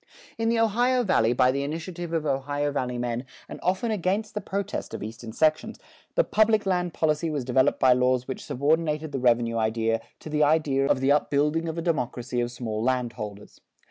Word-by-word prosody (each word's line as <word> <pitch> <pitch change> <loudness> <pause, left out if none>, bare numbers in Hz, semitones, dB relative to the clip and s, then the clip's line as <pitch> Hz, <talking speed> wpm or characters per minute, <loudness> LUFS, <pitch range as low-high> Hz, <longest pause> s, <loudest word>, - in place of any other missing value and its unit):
In 225 0 +1
the 230 - +2
Ohio 245 +3 +2
Valley, 120 - +3
by 125 +1 +4
the 140 +1 -1
initiative 165 +4 -5
of 165 -2 -1
Ohio 145 +1 -1
Valley 125 -3 -2
men, 120 0 -2 0.2
and - - -8
often 190 +5 0
against 205 +2 -1
the 210 - -3
protest 200 0 -4
of - - -6
Eastern 115 +1 -7
sections, 155 +6 +1 0.4
the - - +4
public 220 - +2
land 180 -2 0
policy 160 +1 +1
was 145 -5 -3
developed 130 +1 +2
by 130 -2 +6
laws 125 0 +1
which 130 - -5
subordinated 155 +2 0
the 135 - -2
revenue 120 -2 +2
idea 115 0 0 0.2
to - - -10
the 150 0 +1
idea 145 -3 +3
of 130 - +2
the 135 +1 +3
upbuilding 150 +3 +1
of 160 - -5
a 165 - -2
democracy 125 -6 -1
of 120 - -1
small 110 -3 -4
landholders. 115 -5 -3
145 Hz, 190 wpm, -26 LUFS, 125-170 Hz, 0.4 s, by